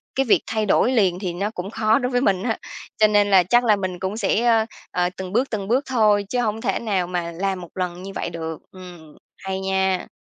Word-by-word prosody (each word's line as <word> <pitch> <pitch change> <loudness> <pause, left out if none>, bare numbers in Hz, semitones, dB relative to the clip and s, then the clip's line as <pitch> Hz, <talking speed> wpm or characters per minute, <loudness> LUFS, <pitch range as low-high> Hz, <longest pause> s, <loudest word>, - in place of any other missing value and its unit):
cái 270 - +1
việc 230 - +4
thay 220 -1 -1
đổi 225 +4 +3
liền 190 -8 +2
thì 185 -3 -3
nó 200 +4 -2
cũng 195 -1 -6
khó 220 +2 +2
đối 250 0 -2
với 245 - +1
mình 195 -6 +1
á. 230 -2 -1 0.4
Cho 215 - +5
nên 205 -1 +3
là 190 -2 +6
chắc 240 +7 +3
là 220 -3 +4
mình 185 -3 -4
cũng 190 +3 -3
sẽ, 215 +1 +1
ờ, 225 -2 +4 0.3
ờ, 180 0 +1
từng 185 -1 -6
bước, 250 +5 +1
từng 200 -3 -4
bước 250 +6 +2
thôi 210 -5 +3
chứ 250 - -1
hổng 220 -1 -2
thể - - -1
nào 195 -6 -1
mà 175 -1 -3
làm 190 +2 -2
một 175 - -10
lần 180 -1 -3
như 195 - -7
vậy - - -3
được. 160 -2 -6
Ừm, 175 -5 -12 0.3
hay 190 0 -3
nha! 190 -1 0
195 Hz, 245 wpm, -22 LUFS, 180-220 Hz, 0.4 s, là